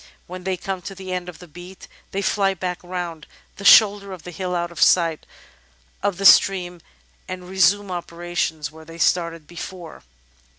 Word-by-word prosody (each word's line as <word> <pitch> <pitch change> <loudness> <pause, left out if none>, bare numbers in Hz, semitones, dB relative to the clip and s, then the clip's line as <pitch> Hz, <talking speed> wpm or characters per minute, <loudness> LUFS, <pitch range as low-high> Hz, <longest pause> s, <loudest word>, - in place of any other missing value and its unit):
When 180 0 -9
they 190 -1 -1
come 190 -1 -5
to 195 +3 -8
the 190 -1 -6
end 180 -1 -4
of 180 - -11
the 180 - -13
beat, 175 +4 -12 0.2
they 195 +1 -3
fly 195 -1 +1
back 180 0 -4
round 175 -3 -6 0.3
the 200 - -9
shoulder 200 -1 +6
of 180 - -10
the 180 - -8
hill 180 +1 -4
out 175 0 -2
of 170 - -7
sight 165 -3 +3 0.7
of 200 -2 -1
the 195 - -3
stream 180 -3 +5 0.5
and 185 -1 -7
resume 190 +1 +2
operations 170 -3 -3
where 160 0 -14
they 165 +1 -12
started 170 -2 0
before. 175 +1 -9
180 Hz, 175 wpm, -22 LUFS, 170-190 Hz, 0.7 s, shoulder